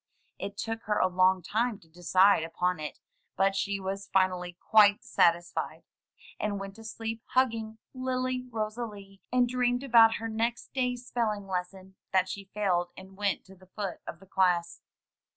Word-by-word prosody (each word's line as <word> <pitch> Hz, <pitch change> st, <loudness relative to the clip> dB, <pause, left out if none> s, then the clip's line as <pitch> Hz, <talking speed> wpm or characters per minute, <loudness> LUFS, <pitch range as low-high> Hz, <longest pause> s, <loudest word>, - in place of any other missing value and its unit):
It 200 Hz, 0 st, -5 dB
took 225 Hz, +1 st, -3 dB
her 210 Hz, 0 st, +1 dB
a -, -, +4 dB
long 185 Hz, 0 st, +3 dB
time 225 Hz, +4 st, 0 dB
to 165 Hz, -, -21 dB
decide 180 Hz, +3 st, +4 dB
upon 180 Hz, +1 st, -1 dB
it, 150 Hz, -1 st, -6 dB, 0.4 s
but 195 Hz, +1 st, +3 dB
she 200 Hz, 0 st, -1 dB
was 195 Hz, +1 st, -4 dB
finally 180 Hz, -2 st, +1 dB
quite 210 Hz, -2 st, +5 dB
satisfied, 175 Hz, 0 st, +1 dB, 0.6 s
and 205 Hz, -1 st, -1 dB
went 195 Hz, 0 st, -7 dB
to 225 Hz, -, -11 dB
sleep 225 Hz, 0 st, -5 dB
hugging 225 Hz, -4 st, +1 dB, 0.2 s
Lily 255 Hz, -1 st, -2 dB
Rosalie, 215 Hz, -3 st, -5 dB
and 250 Hz, 0 st, +3 dB
dreamed 245 Hz, +1 st, 0 dB
about 230 Hz, -4 st, +6 dB
her 225 Hz, -, -4 dB
next 230 Hz, +2 st, -2 dB
day's 250 Hz, -2 st, -1 dB
spelling 215 Hz, -5 st, -1 dB
lesson 190 Hz, 0 st, -5 dB
— -, -, -48 dB
^that 185 Hz, 0 st, +4 dB
she 200 Hz, +1 st, -6 dB
failed 180 Hz, -4 st, 0 dB
and 190 Hz, 0 st, -12 dB
went 200 Hz, -1 st, -1 dB
to 190 Hz, -, -14 dB
the 185 Hz, 0 st, -19 dB
foot 195 Hz, -1 st, -5 dB
of 170 Hz, -, -7 dB
the 195 Hz, -, -16 dB
class. 180 Hz, -3 st, +1 dB
200 Hz, 170 wpm, -29 LUFS, 185-225 Hz, 0.6 s, about